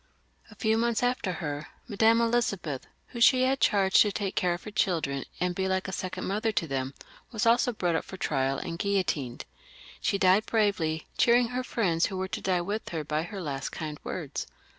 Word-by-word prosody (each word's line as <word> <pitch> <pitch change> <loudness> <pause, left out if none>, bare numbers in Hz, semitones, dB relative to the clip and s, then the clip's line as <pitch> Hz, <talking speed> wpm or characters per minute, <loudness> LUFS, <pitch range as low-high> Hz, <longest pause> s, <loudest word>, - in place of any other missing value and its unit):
A 215 - -14
few 220 +1 +1
months 235 0 +1
after 245 -6 0
her, 145 -3 -4 0.2
Madame 225 +1 +4
Elizabeth, 210 - 0 0.2
whom 235 - -7
she 255 +1 +6
had 265 +1 +2
chaiged 195 -2 +4
to 210 - +4
take 200 -1 -2
care 175 -1 +1
of 175 - -11
her 215 - -7
children, 160 -9 0
and 180 0 0
be 190 +1 -1
like 190 0 0
a - - -4
second 185 0 -4
mother 215 +3 0
to 170 - 0
them, 135 -2 -3 0.4
was 225 -1 -1
also 240 +2 +4
brought 180 -6 -1
up - - 0
for 190 - -9
trial 135 -5 0
and 170 -1 -5
guillotined. 175 -11 -1 0.6
She 200 - +1
died 190 +2 +4
bravely, 185 -8 +1
cheering 240 0 +5
her 250 +1 -2
friends 180 -10 +1
who 190 - -5
were 190 0 -2
to - - -4
die 185 -2 +1
with 205 +5 -3
her 160 -3 -3
by 150 +1 -1
her 185 +4 -6
last 140 -3 -3
kind 155 -2 -6
words. - - -4
190 Hz, 205 wpm, -28 LUFS, 160-220 Hz, 0.6 s, she